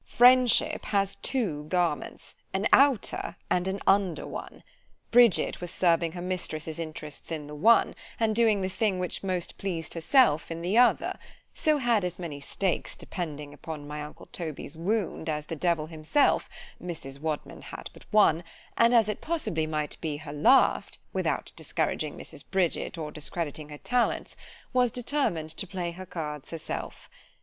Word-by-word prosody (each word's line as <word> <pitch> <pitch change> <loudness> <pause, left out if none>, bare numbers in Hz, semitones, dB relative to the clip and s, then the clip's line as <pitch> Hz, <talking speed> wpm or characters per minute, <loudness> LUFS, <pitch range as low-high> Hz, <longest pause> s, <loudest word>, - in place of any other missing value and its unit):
Friendship 250 -1 +5
has 200 -1 0
two 180 - -2
garments; 175 -2 -1 0.2
an 195 +2 0
outer 275 -5 +3 0.2
and 180 +1 +2
an 190 +1 -2
under 195 -4 +2
one. - - -8 0.5
Bridget 240 -7 +5
was 175 - -4
serving 170 -2 +2
her 175 -1 -6
mistress's 165 -3 -3
interests 155 -1 -6
in 155 -2 -3
the 150 - -9
one—and 220 +4 +2
doing 220 -3 +4
the - - +1
thing 190 +1 0
which 180 -1 -2
most 185 -3 -2
pleased 175 -4 -2
herself 165 - +3
in 165 0 -5
the 185 +4 0
other: 245 +1 +4 0.3
so 310 -2 +2
had 240 -6 +2
as 180 -1 -3
many 165 -5 -6
stakes 180 +5 -2
depending 150 -5 -6
upon 155 -3 -7
my 150 0 -5
uncle 150 0 -9
Toby's 160 -3 -6
wound, 180 -1 -1
as 150 -1 -2
the 165 - -5
Devil 165 -1 +1
himself——Mrs. 155 - -1
Wadman 155 0 -4
had - - -8
but - - -15
one—and 210 +4 +3
as 225 -3 +5
it 210 - -3
possibly 215 - -1
might 150 -1 -3
be 155 -3 -2
her 145 -1 -8
last 155 - +4 0.2
(without - - -1
discouraging - - -2
Mrs. - - -8
Bridget, 185 -2 0
or 155 -2 -4
discrediting 155 -1 -4
her 150 - -8
talents) 245 +8 0 0.4
was 250 -1 +4
determined 230 - -1
to 175 +4 -4
play 180 -2 -3
her 185 +2 -9
cards 150 -5 -5
herself. 165 -2 -6
175 Hz, 155 wpm, -28 LUFS, 155-210 Hz, 0.5 s, Friendship